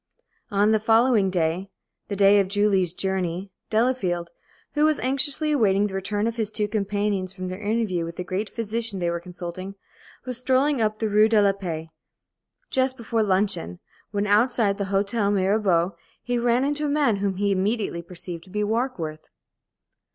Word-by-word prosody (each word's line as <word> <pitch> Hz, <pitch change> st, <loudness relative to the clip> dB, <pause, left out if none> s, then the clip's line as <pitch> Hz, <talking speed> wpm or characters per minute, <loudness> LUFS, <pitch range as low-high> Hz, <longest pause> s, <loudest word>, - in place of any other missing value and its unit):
On 205 Hz, 0 st, +3 dB
the 220 Hz, -, +3 dB
following 225 Hz, -1 st, +4 dB
day 180 Hz, +1 st, -1 dB, 0.4 s
the 200 Hz, -, -3 dB
day 200 Hz, +1 st, +6 dB
of 195 Hz, -, +2 dB
Julie's 195 Hz, -3 st, +2 dB
journey 190 Hz, 0 st, -2 dB, 0.2 s
Delafield, 205 Hz, -8 st, 0 dB, 0.4 s
who 295 Hz, -, +2 dB
was 310 Hz, -1 st, +3 dB
anxiously 275 Hz, +4 st, +1 dB
awaiting 205 Hz, -8 st, +3 dB
the 200 Hz, -, -4 dB
return 205 Hz, +2 st, -1 dB
of 230 Hz, +1 st, -2 dB
his 220 Hz, -3 st, 0 dB
two 215 Hz, -1 st, -1 dB
companions 200 Hz, -2 st, -1 dB
from 185 Hz, -1 st, -5 dB
their 185 Hz, +3 st, -6 dB
interview 210 Hz, -5 st, 0 dB
with 165 Hz, 0 st, -6 dB
the 180 Hz, -, -4 dB
great 195 Hz, +3 st, -3 dB
physician 230 Hz, -1 st, -3 dB
they 175 Hz, -1 st, 0 dB
were 170 Hz, -, -2 dB
consulting, 180 Hz, +2 st, -7 dB, 0.5 s
was 250 Hz, -2 st, -5 dB
strolling 260 Hz, +1 st, +2 dB
up 215 Hz, -1 st, +1 dB
the 220 Hz, -, -1 dB
Rue 215 Hz, +1 st, +4 dB
de 220 Hz, -1 st, +4 dB
la 200 Hz, -1 st, +5 dB
Paix, 165 Hz, -5 st, -5 dB, 0.8 s
just 260 Hz, 0 st, +1 dB
before 230 Hz, -1 st, -1 dB
luncheon, 190 Hz, -, 0 dB, 0.3 s
when, 205 Hz, 0 st, -1 dB
outside 210 Hz, -1 st, +2 dB
the 200 Hz, -, 0 dB
Hôtel 200 Hz, +2 st, +1 dB
Mirabeau, 190 Hz, -3 st, +2 dB, 0.3 s
he 245 Hz, 0 st, -1 dB
ran 240 Hz, +1 st, +2 dB
into 295 Hz, +1 st, -1 dB
a -, -, 0 dB
man 285 Hz, -7 st, +2 dB
whom 195 Hz, -1 st, -1 dB
he 200 Hz, +1 st, 0 dB
immediately 195 Hz, -2 st, 0 dB
perceived 170 Hz, -1 st, -8 dB
to -, -, -17 dB
be 210 Hz, +2 st, -1 dB
Warkworth. 210 Hz, -9 st, -2 dB
205 Hz, 175 wpm, -24 LUFS, 185-230 Hz, 0.8 s, day